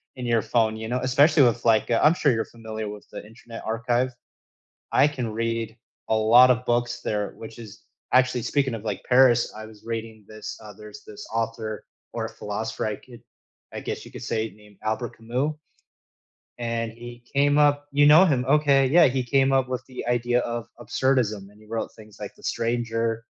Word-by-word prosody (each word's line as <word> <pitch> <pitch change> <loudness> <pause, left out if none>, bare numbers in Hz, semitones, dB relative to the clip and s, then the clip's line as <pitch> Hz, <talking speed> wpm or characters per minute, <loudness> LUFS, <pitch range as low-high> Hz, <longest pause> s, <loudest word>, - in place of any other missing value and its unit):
in 125 -1 -6
your 115 -2 +2
phone, 110 -1 +1
you 110 0 -6
know 125 +1 0
especially 140 +4 +4
with 120 -1 +2
like, 110 -2 +3
uh 115 - +2
I'm 155 - +6
sure 150 -5 +2
you're 110 -1 0
familiar 110 -2 -7
with 105 0 -10
the - - -8
Internet 115 +1 -11
Archive. 125 +3 0 0.8
I 145 - +5
can 125 -6 -4
read 115 0 -2 0.3
a 110 - +3
lot 120 +4 +6
of 125 0 -1
books 120 0 0
there, 105 -3 -2
which 110 0 -10
is 110 -2 -12 0.3
actually 125 -1 +3
speaking 135 -2 0
of 110 - -8
like, 105 -3 -4
Paris, 125 -2 +5
I 110 - -7
was 110 -1 -15
reading 115 -1 -5
this 110 -1 -8
uh, 105 -1 -10
there's 105 +1 -12
this 105 - -10
author, 115 -1 -3 0.3
or 115 -1 -3
a - - -5
philosopher, 110 0 -4
I 105 - -1
could 120 -2 -16 0.5
I - - -4
guess - - -5
you - - -13
could - - -9
say, 110 0 -2
named 105 -1 -19
Albert 110 +2 -3
Camus 125 +7 -2 1.0
and 115 -1 -2
he 120 +1 -11
came 145 +1 +3
up 145 -1 +3
You 145 +1 +5
know 155 +5 +8
him, 135 -8 +1
okay? 140 -2 +4
Yeah, 165 +5 +6
he 130 0 0
came 135 +2 +2
up 135 -1 +2
with 130 0 -4
the 130 - -8
idea 120 0 +1
of 120 -1 -4
absurdism, 120 -6 0
and 105 - -21
he 110 - -18
wrote 115 +1 -4
things 110 -2 -15
like - - -7
The - - -21
Stranger, 115 -1 -1
115 Hz, 200 wpm, -24 LUFS, 110-130 Hz, 1.0 s, know